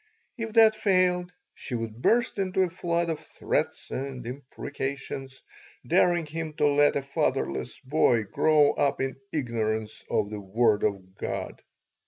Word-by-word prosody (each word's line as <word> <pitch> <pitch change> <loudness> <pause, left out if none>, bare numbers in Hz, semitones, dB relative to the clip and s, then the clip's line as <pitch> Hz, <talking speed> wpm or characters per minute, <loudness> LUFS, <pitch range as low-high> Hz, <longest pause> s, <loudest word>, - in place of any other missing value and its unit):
If 225 -3 -5
that 225 -1 +7
failed 185 -4 +2 0.2
she 125 - -6
would 115 0 -5
burst 235 - +2
into 190 0 +1
a 180 - -1
flood 170 -1 0
of 160 - -3
threats - - -3
and 130 -2 -4
imprecations, 135 +1 -6 0.4
daring 175 -2 +3
him 160 +1 -5
to 150 - +1
let 145 0 +4
a 140 - 0
fatherless 70 - -1
boy 130 -5 +2
grow 150 +7 +4
up 140 -1 0
in 135 +1 -2
ignorance 110 -5 -2
of 105 -1 0
the 105 - -4
Word 105 +2 +2
of 95 -3 -2
God. - - -4
140 Hz, 145 wpm, -27 LUFS, 115-175 Hz, 0.4 s, that